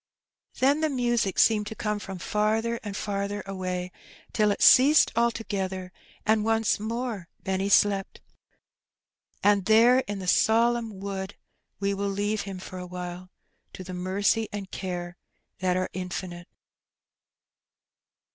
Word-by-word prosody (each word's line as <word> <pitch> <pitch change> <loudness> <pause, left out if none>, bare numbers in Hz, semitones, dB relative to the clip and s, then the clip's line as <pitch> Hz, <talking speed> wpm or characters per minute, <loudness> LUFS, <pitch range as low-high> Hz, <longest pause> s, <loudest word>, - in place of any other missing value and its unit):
Then 280 +3 +3
the 315 - +2
music 240 -7 0
seemed 210 -2 +4
to 220 - -6
come 210 -1 -2
from 195 -1 -7
farther 220 +4 0
and 205 -2 -6
farther 200 0 -3
away, 185 -2 -4 0.4
till 215 -2 +3
it 205 - 0
ceased 285 +4 +7
altogether, 195 -6 -1 0.3
and 215 0 +3
once 225 -1 +1
more 225 -3 -4 0.2
Benny 190 +1 -1
slept. 200 -1 +2 1.2
And 200 -2 +3
there 230 +4 +6
in 205 0 -3
the 190 - -6
solemn 230 0 +2
wood 195 0 -5 0.4
we 200 0 0
will 200 0 -2
leave 205 +2 -1
him 190 - -6
for 185 0 -8
awhile 180 0 -7 0.4
to 185 - -8
the 185 0 -8
mercy 200 +5 0
and 200 -2 -6
care 175 -2 -5 0.4
that 185 -1 +1
are 185 - -2
infinite. 180 -1 -6
200 Hz, 130 wpm, -26 LUFS, 185-220 Hz, 1.2 s, ceased